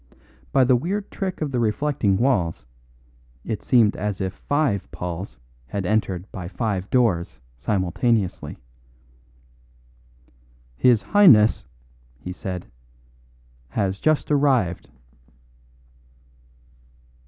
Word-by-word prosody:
By 135 - +4
the 125 0 +4
weird 195 +10 -2
trick 190 -4 -4
of 150 -3 -2
the 125 - -1
reflecting 110 -3 +1
walls, 95 - 0 0.8
it 110 - -3
seemed 115 -4 +3
as 105 -2 -3
if 95 -1 -2
five 145 -9 -1
Pauls 90 -7 -6 0.3
had 95 +7 -4
entered 95 -3 0
by 90 -3 -6
five 100 0 -3
doors 110 -10 +1 0.2
simultaneously. 95 - -1 2.2
"His 120 - +3
Highness," 140 - +5 0.5
he 90 +8 -7
said, 90 -1 -6 1.0
"has 95 +5 -1
just 155 -1 +1
arrived." 130 - +1
105 Hz, 95 wpm, -23 LUFS, 95-130 Hz, 2.2 s, Highness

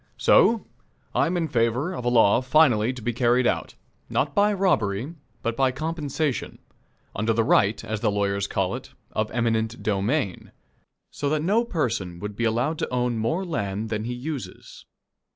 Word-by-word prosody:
So, 230 -2 +4 0.5
I - - +2
am 180 +2 -1
in 165 -2 0
favor 125 +6 0
of 125 - -5
a - - +3
law 115 -1 +4
finally 125 -5 +4
to 125 -3 -9
be 120 - -1
carried 120 +1 +2
out - - -1 0.3
not 140 0 0
by 205 +4 +3
robbery, 145 - 0 0.3
but 115 0 -1
by 135 0 +2
compensation, 155 -1 -3 0.6
under 110 +2 +1
the 115 0 +2
right, 105 -1 +2
as 110 -1 -3
the 110 - +1
lawyers 100 -1 0
call 95 -2 -1
it, - - -8 0.2
of 110 0 -1
eminent 115 -1 -1
domain 105 - -1 0.6
so 145 - -2
that 155 0 0
no 210 +7 +3
person 115 - -2
would 105 +3 -6
be 115 - -1
allowed 120 +8 0
to - - -2
own 125 -2 0
more 140 +13 -1
land 105 - -3
than 110 0 -2
he 120 - -3
uses. 135 +1 -7
120 Hz, 170 wpm, -25 LUFS, 110-150 Hz, 0.6 s, So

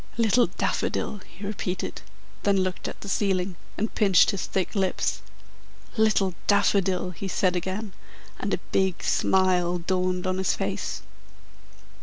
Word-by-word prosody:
"Little 235 +1 +4
Daffodil!" 205 - -2
he 200 +3 -9
repeated, 190 -3 -3 0.4
then 200 -1 +3
looked 185 -1 -3
at - - -7
the - - -7
ceiling 190 -2 0 0.2
and 220 +2 -1
pinched 195 -3 +5
his 200 -4 -3
thick 190 -2 -1
lips. 190 -3 0 0.7
"Little 215 -4 +3
Daffodil!" 195 -3 +2
he 190 +3 -6
said 185 0 +1
again, 190 +3 -3 0.5
and - - -2
a - - +2
big 190 -2 +1
smile 180 -2 +2
dawned 180 +1 -1
on 185 0 0
his 190 - +1
face. - - -3
190 Hz, 135 wpm, -26 LUFS, 185-200 Hz, 0.7 s, pinched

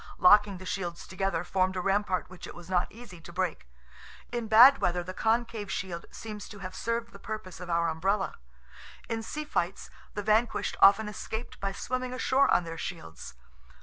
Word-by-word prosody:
Locking 205 +1 +6
the 185 - -10
shields 180 -3 -4
together 185 -2 -1
formed 185 +1 0
a - - -1
rampart 195 0 0
which 185 -1 -10
it - - -10
was 175 +1 -11
not 180 -1 +1
easy 210 -7 -12
to 170 - -11
break; 180 - -2 0.6
in 240 -2 -3
bad 245 +6 +9
weather 175 0 0
the 185 +2 -6
concave 225 -1 0
shield 175 -4 -4
seems 210 -2 -8
to 205 - -10
have 185 -1 -7
served 230 0 -2
the 200 - -13
purpose 200 -5 -6
of 180 -1 -8
our 170 0 +2
umbrella; 190 +5 0 0.8
in 225 -1 -1
sea 300 +7 -5
fights 185 -10 -2 0.2
the 205 - -3
vanquished 220 +3 +1
often 200 +2 +7
escaped 220 +2 -6
by 195 0 -2
swimming 255 +5 -3
ashore 265 +2 +3
on - - +4
their 165 -1 -7
shields. 80 - -7
195 Hz, 180 wpm, -29 LUFS, 180-220 Hz, 0.8 s, bad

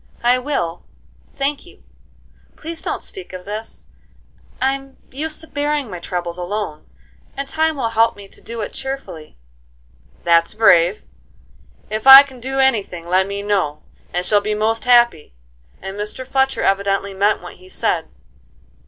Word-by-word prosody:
"I 245 +1 +4
will, 180 - -3 0.5
thank 280 +1 -1
you. - - -18 0.7
Please 330 +1 -6
don't - - -3
speak 380 - -9
of 185 0 -8
this; 215 +2 -7 0.7
I'm 270 0 -2
used 305 +4 -4
to 320 - -11
bearing 290 -5 -2
my 180 - -6
troubles 175 0 -4
alone, 180 -4 -4 0.5
and 275 0 -3
time 315 +2 0
will 235 -4 -1
help 230 0 +2
me 200 -1 -12
to - - -17
do 230 -1 -6
it 210 - -5
cheerfully." 265 - -7 0.9
"That's 170 +3 +3
brave! 185 -3 +4 0.9
If 215 +4 -3
I 270 +1 +13
can 265 -3 -13
do 265 +3 -4
any 265 -5 +4
thing, 175 -3 -10
let 185 +2 +2
me 200 0 -4
know; 190 -8 -1 0.3
I 180 - -1
shall 205 +2 +3
be 210 +1 -2
most 225 +3 0
happy." 235 - +3 0.5
And 195 0 -6
Mr. 210 +5 -5
Fletcher 265 +1 0
evidently 195 0 0
meant 200 0 +1
what 175 - -10
he 185 - -17
said. - - -1
215 Hz, 155 wpm, -19 LUFS, 185-265 Hz, 0.9 s, I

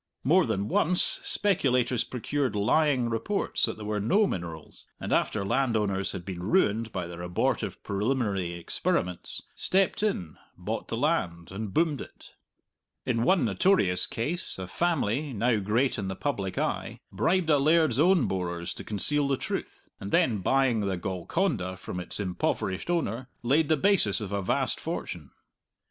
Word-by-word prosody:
More 165 +4 +4
than 100 -2 -1
once, 180 +10 +3
speculators 125 - +1
procured 130 0 -2
lying 130 +4 +2
reports 155 - 0
that 110 - -4
there 105 - -7
were 105 0 -1
no 195 - +3
minerals, 85 - -6
and - - -2
after 100 -2 +1
landowners 105 -5 0
had 90 -3 -6
been 95 -3 -5
ruined 110 - +1
by 90 -2 -3
their 85 0 -8
abortive 90 0 -1
preliminary 100 -4 -1
experiments, 85 +1 -2
stepped 190 +1 +1
in, 90 - -2 0.2
bought - - -4
the - - -3
land, 85 0 -1
and 100 +1 -5
boomed 155 - +1
it. - - -11 0.7
In 115 -2 0
one 175 +1 +3
notorious 100 - +3
case 155 +10 -3
a 95 - -5
family, 145 - 0
now 115 +1 +2
great 115 +6 +1
in 100 - -3
the 95 - -3
public 100 -9 -3
eye, - - -2
bribed 160 - +1
a 145 - +5
laird's 155 -3 +3
own 175 -2 +4
borers 85 -2 -3
to - - -9
conceal 140 +8 +2
the 135 -1 +1
truth, - - -5
and 95 - -6
then 110 -5 +3
buying 130 +3 +2
the 100 -3 -1
Golconda 95 - -2
from 90 - -6
its 90 - -3
impoverished 95 - -2
owner, 130 -7 -1
laid 145 +5 +2
the 155 - +4
basis 140 - +3
of 105 -3 -5
a 100 0 -1
vast 90 - 0
fortune. - - -5
110 Hz, 155 wpm, -28 LUFS, 95-145 Hz, 0.7 s, a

